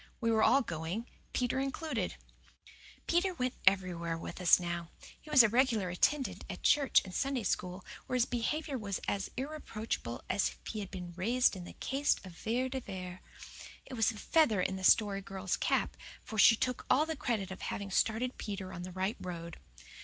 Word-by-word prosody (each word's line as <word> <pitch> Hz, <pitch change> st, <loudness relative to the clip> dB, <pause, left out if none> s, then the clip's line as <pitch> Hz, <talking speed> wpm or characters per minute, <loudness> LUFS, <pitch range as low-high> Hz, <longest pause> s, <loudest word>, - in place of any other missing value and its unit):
We 230 Hz, -2 st, +1 dB
were 220 Hz, -1 st, +3 dB
all 275 Hz, +4 st, +5 dB
going, 170 Hz, +4 st, -4 dB, 0.3 s
Peter 250 Hz, +1 st, 0 dB
included. 275 Hz, +4 st, -2 dB, 0.9 s
Peter 355 Hz, +2 st, +1 dB
went 255 Hz, -4 st, -1 dB
everywhere 175 Hz, -3 st, +2 dB
with 165 Hz, -, -7 dB
us 180 Hz, -, +7 dB
now. 175 Hz, -1 st, -4 dB, 0.3 s
He 310 Hz, -, -14 dB
was 280 Hz, -5 st, +8 dB
a -, -, +6 dB
regular 230 Hz, -4 st, +2 dB
attendant 270 Hz, +9 st, +1 dB
at -, -, -7 dB
church 285 Hz, -3 st, +5 dB
and 185 Hz, -, -9 dB
Sunday 270 Hz, -1 st, -1 dB
School, 180 Hz, -1 st, -2 dB, 0.2 s
where 255 Hz, -, -2 dB
his 245 Hz, -1 st, +4 dB
behaviour 265 Hz, +3 st, -2 dB
was 200 Hz, -3 st, -3 dB
as 200 Hz, -, -1 dB
irreproachable 230 Hz, -, -4 dB
as 200 Hz, -, +1 dB
if -, -, -13 dB
he 215 Hz, -, -4 dB
had 200 Hz, -2 st, -5 dB
been 180 Hz, -2 st, -7 dB
"raised" 235 Hz, +6 st, +2 dB
in 180 Hz, -2 st, -7 dB
the -, -, -9 dB
caste 275 Hz, -6 st, 0 dB
of 185 Hz, -, -9 dB
Vere 235 Hz, +9 st, -1 dB
de 265 Hz, 0 st, -3 dB
Vere. 185 Hz, -5 st, -7 dB, 0.6 s
It 265 Hz, -, -10 dB
was 225 Hz, -2 st, +3 dB
a 225 Hz, -, -5 dB
feather 230 Hz, -, +3 dB
in 190 Hz, +1 st, 0 dB
the 190 Hz, -, -6 dB
Story 200 Hz, 0 st, +5 dB
Girl's 190 Hz, -1 st, -3 dB
cap, -, -, 0 dB, 0.3 s
for 220 Hz, -, -5 dB
she 225 Hz, -, +8 dB
took 250 Hz, +2 st, -2 dB
all 300 Hz, +4 st, +5 dB
the 320 Hz, 0 st, -3 dB
credit 215 Hz, -9 st, -2 dB
of 190 Hz, -, -8 dB
having 200 Hz, -1 st, -4 dB
started 230 Hz, +6 st, +1 dB
Peter 195 Hz, -3 st, -5 dB
on 175 Hz, -, -6 dB
the 180 Hz, +1 st, -6 dB
right 190 Hz, +5 st, -2 dB
road. 170 Hz, -2 st, -6 dB
215 Hz, 190 wpm, -32 LUFS, 185-255 Hz, 0.9 s, was